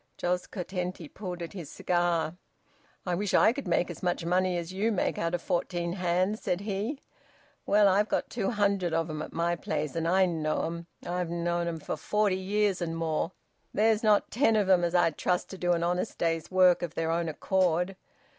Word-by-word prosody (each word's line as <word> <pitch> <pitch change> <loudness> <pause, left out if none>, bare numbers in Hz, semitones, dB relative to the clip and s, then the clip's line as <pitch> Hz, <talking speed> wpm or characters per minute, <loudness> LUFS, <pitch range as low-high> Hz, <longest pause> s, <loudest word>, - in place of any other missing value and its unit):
Jos 180 0 -1
Curtenty 180 -3 -4
pulled 180 0 -6
at 170 - -7
his 170 -7 -7
cigar. 175 -2 0 0.7
"I 180 - -1
wish 200 +3 0
I 220 - +6
could 275 -6 -6
make 175 0 +1
as 170 - -10
much 175 -2 -1
money 180 +1 +2
as 170 +1 -5
you 210 +4 +1
make 200 - 0
out 170 +1 0
of 175 - -5
fourteen 175 0 -1
hands!" 185 +3 0
said 180 +1 -1
he. 215 +7 -3 0.7
"Well, 205 0 +5
I've 200 +3 +3
got - - -1
two 220 -5 -1
hundred 200 -6 +1
of 165 -1 0
'em 155 0 -4
at - - -6
my 170 +1 0
place. 150 -4 -3
And 165 0 -1
I 190 +2 +4
know 160 -3 -1
'em! 170 +1 -4 0.2
I've 175 -1 -2
known 170 0 -1
'em 165 -1 -3
for 155 - -4
forty 205 +5 +1
years 200 0 0
and 165 -1 -2
more. 165 +1 -1 0.4
There's 220 0 +3
not 210 -2 +3
ten 230 -2 +3
of 210 -3 +2
'em 180 -2 +5
as 170 +1 0
I'd 165 -3 +2
trust 180 -1 0
to 190 - -7
do 175 0 +2
an 170 0 0
honest 180 +4 -1
day's 165 -1 -1
work, 185 -1 +5
of 170 -2 -4
their 165 0 0
own 165 0 0
accord... 180 +2 +1
180 Hz, 205 wpm, -29 LUFS, 170-195 Hz, 0.7 s, I